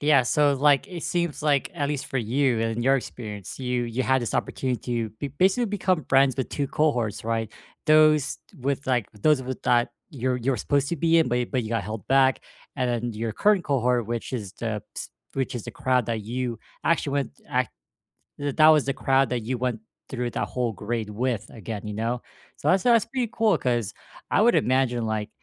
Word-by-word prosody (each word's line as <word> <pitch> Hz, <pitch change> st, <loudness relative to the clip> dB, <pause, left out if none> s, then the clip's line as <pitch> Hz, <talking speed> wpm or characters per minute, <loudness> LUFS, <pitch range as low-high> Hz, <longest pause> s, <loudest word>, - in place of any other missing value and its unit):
Yeah, 145 Hz, -3 st, +5 dB
so, 145 Hz, +3 st, +3 dB
like, 145 Hz, +6 st, +3 dB
it 175 Hz, -3 st, -6 dB
seems 170 Hz, -5 st, -1 dB
like, 145 Hz, -3 st, +2 dB
at 145 Hz, -1 st, -1 dB
least 145 Hz, -2 st, -3 dB
for 135 Hz, -, -2 dB
you 125 Hz, +1 st, +1 dB
and 115 Hz, 0 st, -1 dB
in 120 Hz, -, -1 dB
your 135 Hz, +2 st, +4 dB
experience, 105 Hz, -6 st, -7 dB
you 125 Hz, -1 st, -1 dB
you 120 Hz, +2 st, -2 dB
had 130 Hz, 0 st, +2 dB
this 115 Hz, -, -3 dB
opportunity 130 Hz, -2 st, -1 dB, 0.3 s
to -, -, -8 dB
be 140 Hz, -, -2 dB
basically 190 Hz, -, +2 dB
become 185 Hz, -5 st, 0 dB
friends 135 Hz, -1 st, +4 dB
with 130 Hz, -, -2 dB
2 140 Hz, -1 st, -2 dB
cohorts, 125 Hz, -9 st, 0 dB
right? 115 Hz, -1 st, -1 dB, 0.3 s
Those 155 Hz, -2 st, +5 dB, 0.2 s
with, 140 Hz, +2 st, -2 dB
like 125 Hz, -5 st, +1 dB
those 130 Hz, +6 st, +2 dB
with 130 Hz, 0 st, -6 dB
that 120 Hz, -1 st, +3 dB, 0.2 s
you're 130 Hz, -3 st, -1 dB
you're 125 Hz, +1 st, 0 dB
supposed 140 Hz, +5 st, 0 dB
to 170 Hz, -, -1 dB
be 165 Hz, +2 st, +3 dB
in, 160 Hz, -, +3 dB
but 120 Hz, +1 st, +1 dB
you 125 Hz, -, 0 dB
but 130 Hz, -2 st, -1 dB
you 110 Hz, -, -5 dB
got 115 Hz, -, 0 dB
held 110 Hz, -3 st, -6 dB
back, 135 Hz, -1 st, +4 dB, 0.3 s
and 125 Hz, -1 st, 0 dB
then 120 Hz, 0 st, -2 dB
your 110 Hz, +1 st, -3 dB
current 205 Hz, -, +3 dB
cohort, 125 Hz, -4 st, +1 dB
which 120 Hz, +1 st, -4 dB
is 105 Hz, -6 st, -4 dB
the 110 Hz, -3 st, -3 dB
ps -, -, -5 dB, 0.3 s
which 135 Hz, -2 st, -2 dB
is 120 Hz, -, -4 dB
the -, -, -6 dB
crowd 125 Hz, -3 st, 0 dB
that 115 Hz, -2 st, -1 dB
you 120 Hz, +2 st, -3 dB, 0.3 s
actually 155 Hz, -4 st, +1 dB
went 140 Hz, -1 st, 0 dB, 0.2 s
ac 125 Hz, -2 st, +1 dB, 0.7 s
that 145 Hz, -1 st, -3 dB
that 155 Hz, -1 st, +7 dB
was 155 Hz, -2 st, +5 dB
the 140 Hz, -, 0 dB
crowd 135 Hz, -1 st, +2 dB
that 125 Hz, -2 st, -1 dB
you 125 Hz, +3 st, -2 dB
went 125 Hz, -3 st, -1 dB, 0.3 s
through 125 Hz, -2 st, -2 dB
that -, -, -2 dB
whole 125 Hz, -2 st, -1 dB
grade 110 Hz, +1 st, -3 dB
with, 115 Hz, -1 st, -1 dB
again, 110 Hz, -1 st, -6 dB
you 105 Hz, -, -4 dB
know? 115 Hz, +3 st, -2 dB, 0.3 s
So, -, -, -1 dB
that's 185 Hz, 0 st, +3 dB
a -, -, +5 dB
that's 230 Hz, -1 st, +5 dB
pretty 245 Hz, -1 st, -2 dB
cool 225 Hz, -2 st, +3 dB
'cause 120 Hz, -4 st, -1 dB, 0.4 s
I -, -, +4 dB
would 235 Hz, +2 st, +5 dB
imagine, 125 Hz, -2 st, +2 dB
like, 110 Hz, -1 st, -2 dB
130 Hz, 215 wpm, -25 LUFS, 115-145 Hz, 0.7 s, that